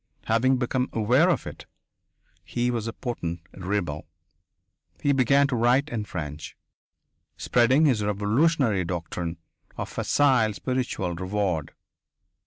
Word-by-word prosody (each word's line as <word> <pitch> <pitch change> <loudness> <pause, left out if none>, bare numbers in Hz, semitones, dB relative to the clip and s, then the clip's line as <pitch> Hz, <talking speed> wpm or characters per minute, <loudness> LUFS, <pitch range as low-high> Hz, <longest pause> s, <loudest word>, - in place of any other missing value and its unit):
Having 130 +4 +3
become 125 +1 -1
aware 110 -2 +3
of - - 0
it, - - -9 0.8
he 120 0 -1
was 115 -2 -2
a 115 - -4
potent 85 -11 -4
rebel. 90 -6 -3 0.9
He 145 - +2
began 140 +2 +4
to 140 -2 -1
write 125 +5 +2
in 110 -5 -3
French, 75 -4 -6 0.8
spreading 130 +6 +3
his 120 -8 +2
revolutionary 105 - +2
doctrine 85 0 -4 0.4
of - - -4
facile 130 -7 +2
spiritual 125 -9 -2
reward. 90 -3 -2
110 Hz, 115 wpm, -25 LUFS, 90-130 Hz, 0.9 s, began